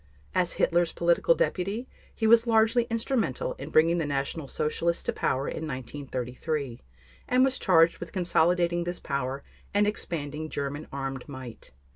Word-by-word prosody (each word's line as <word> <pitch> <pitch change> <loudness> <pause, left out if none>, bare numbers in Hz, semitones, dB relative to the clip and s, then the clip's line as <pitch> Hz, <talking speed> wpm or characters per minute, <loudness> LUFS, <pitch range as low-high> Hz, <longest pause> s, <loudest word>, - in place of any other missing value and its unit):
As 180 -2 +1
Hitler's 175 -1 +2
political 170 - +3
deputy 220 - -1 0.3
he 220 - -1
was 230 +1 +6
largely 225 +1 +4
instrumental 250 - -1
in - - -6
bringing 165 +2 +4
the 165 - 0
National 140 +2 -2
Socialists 160 +4 -1
to - - -1
power 135 +2 0
in 160 - -4
1933, 130 0 -4 0.5
and 255 +1 +4
was 265 -1 0
charged 165 -3 +4
with - - -7
consolidating 175 -1 +2
this 175 0 -3
power 140 0 -3 0.3
and 205 0 +4
expanding 155 -7 -3
German 145 +1 -4
armed 135 0 -5
might. 130 -4 -9
165 Hz, 145 wpm, -27 LUFS, 140-205 Hz, 0.5 s, was